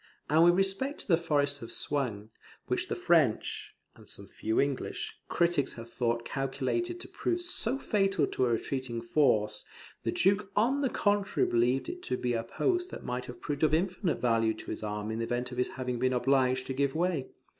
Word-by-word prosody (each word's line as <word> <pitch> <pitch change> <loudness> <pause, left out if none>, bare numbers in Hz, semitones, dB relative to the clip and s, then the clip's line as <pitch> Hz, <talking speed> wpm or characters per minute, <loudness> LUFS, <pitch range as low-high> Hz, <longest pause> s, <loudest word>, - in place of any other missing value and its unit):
And 160 +2 +6
with 175 0 +6
respect 195 +10 0
to - - -9
the 175 - +6
Forest 145 -4 0
of 115 - -7
Soignies, 115 -8 -2 0.4
which - - -1
the - - -2
French - - +1 0.2
(and - - -13
some - - -7
few 110 +1 -1
English) 140 -1 -1 0.2
critics 170 -5 +2
have 115 0 -10
thought 120 -1 0
calculated 140 - -2
to - - -6
prove 350 - -1
so 275 -8 0
fatal 195 -6 +1
to 130 - 0
a - - +1
retreating 120 +1 -2
force, 110 -4 +2 0.4
the - - -1
Duke 200 +1 +2
on 255 +7 +3
the 270 - +2
contrary 205 -2 +1
believed 120 +3 +2
it 360 +1 -6
to 125 - -2
be 125 -1 -1
a 115 - 0
post 360 - 0
that - - -8
might 125 0 -3
have 125 - -9
proved 145 -1 -3
of 155 -1 +4
infinite 180 0 0
value 115 -2 +2
to - - -7
his - - -4
army 105 0 -3
in 110 - -3
the 115 - 0
event 120 +2 -2
of 125 - -5
his 125 - +1
having 125 -2 -2
been 130 +1 +2
obliged 130 0 +2
to 130 - -3
give 140 +1 0
way. 165 -5 0
135 Hz, 200 wpm, -30 LUFS, 120-190 Hz, 0.4 s, And